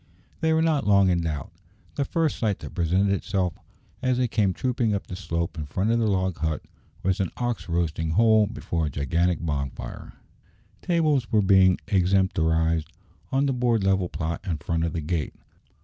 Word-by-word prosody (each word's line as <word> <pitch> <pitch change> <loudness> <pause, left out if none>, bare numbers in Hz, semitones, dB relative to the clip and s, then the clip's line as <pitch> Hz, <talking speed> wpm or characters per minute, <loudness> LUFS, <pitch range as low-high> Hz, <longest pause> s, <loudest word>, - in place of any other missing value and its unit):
They 160 - +1
were 160 0 +3
not 155 -7 +1
long 100 -2 +5
in 85 -1 +1
doubt. 75 -3 -4 0.4
The 140 - -1
first 160 +1 0
sight 105 -4 0
that - - -8
presented 90 +4 +1
itself, 95 -3 -1 0.5
as 130 -1 +1
they 125 -1 +2
came 105 -4 +1
trooping 115 0 0
up 100 - -4
the 90 - -7
slope 85 -2 -3
in 75 - -4
front 95 +9 0
of 115 - +2
the 115 - +1
log 95 -3 0
hut, 80 -1 -2 0.4
was 95 0 +1
an 95 -3 0
ox 120 -6 -3
roasting 80 -1 -1
whole 110 +4 +4
before 85 -7 -2
a - - -2
gigantic 85 +5 0
bonfire. 70 -4 -4 0.7
Tables 155 -8 +1
were 105 -2 +3
being 95 -1 +5
extemporized 80 -4 +2 0.4
on 135 +1 +2
the 135 - +1
broad 120 -4 +1
level 95 -2 +2
plot 80 +2 -3
in 90 -6 -2
front 80 +2 -2
of 85 - -3
the 85 - -2
gate. 80 0 -2
95 Hz, 180 wpm, -25 LUFS, 85-110 Hz, 0.7 s, long